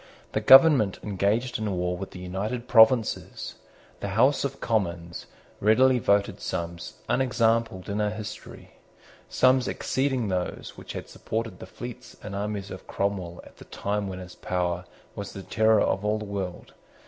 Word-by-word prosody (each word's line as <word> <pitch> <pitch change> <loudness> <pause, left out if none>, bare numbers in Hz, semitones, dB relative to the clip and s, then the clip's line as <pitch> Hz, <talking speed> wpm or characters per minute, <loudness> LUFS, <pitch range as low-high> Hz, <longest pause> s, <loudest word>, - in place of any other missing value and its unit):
The - - -1
government 135 - +7
engaged 105 +5 0
in 110 -2 -2
war 90 0 -1
with 95 +1 -6
the - - -11
United 100 +7 -4
Provinces. 115 -1 +3 0.5
The - - -4
House 135 +4 +4
of 140 0 -3
Commons 85 -6 -2 0.3
readily 125 +5 +4
voted 100 -2 +1
sums 85 0 -4
unexampled 115 -6 +1
in 105 +1 -1
our 105 - +1
history, 110 0 -8 0.6
sums 130 0 +3
exceeding 130 -4 -1
those 90 -1 -3
which - - -9
had - - -6
supported 115 +1 -4
the - - -9
fleets 120 -1 -9
and 100 -1 -6
armies 100 -1 -4
of 95 - -9
Cromwell 95 -4 -3
at - - -17
the - - -13
time 100 0 -3
when 95 -1 -5
his 90 -1 -9
power 90 0 -2 0.3
was 100 -1 -6
the 95 - -8
terror 110 +1 +3
of 95 - 0
all 105 +1 +1
the 105 - -6
world. 95 -3 -5
105 Hz, 160 wpm, -26 LUFS, 95-115 Hz, 0.6 s, government